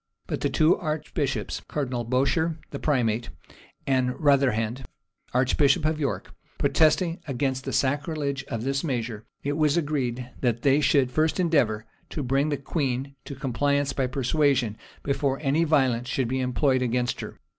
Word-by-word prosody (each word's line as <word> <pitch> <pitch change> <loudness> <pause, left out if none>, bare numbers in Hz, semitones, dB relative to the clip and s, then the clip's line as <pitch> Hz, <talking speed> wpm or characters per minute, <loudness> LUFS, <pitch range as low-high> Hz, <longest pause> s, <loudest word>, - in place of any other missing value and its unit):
But - - -4
the - - +1
two 155 +2 +4
archbishops, 140 - -2
Cardinal 130 -5 -2
Bourchier, 140 +7 +1
the - - -5
primate, 120 - 0 0.6
and 130 -2 +1
Rotherhand, 130 -4 +2 0.5
archbishop 135 +4 +3
of 155 0 +1
York, 140 -4 -3 0.2
protesting 165 +2 +2
against 135 0 -1
the - - -3
sacrilege 140 0 -1
of 115 -3 -4
this 135 +1 -1
measure, 115 -7 -3 0.2
it 145 +1 -1
was 155 0 +3
agreed 130 -6 -1
that 120 -2 0
they 140 +1 +4
should 130 -2 +3
first 155 +5 +1
endeavor 125 -11 +2 0.2
to 150 - -4
bring 135 +4 +1
the 145 - 0
queen 135 -2 -2
to 140 - -7
compliance 140 +1 0
by 130 -1 0
persuasion, 130 -3 +1 0.3
before 140 -1 0
any 150 +3 +2
violence 130 -6 +2
should 130 -2 0
be 130 +1 0
employed 130 +1 +1
against 125 0 0
her. - - -8
135 Hz, 150 wpm, -26 LUFS, 125-150 Hz, 0.6 s, two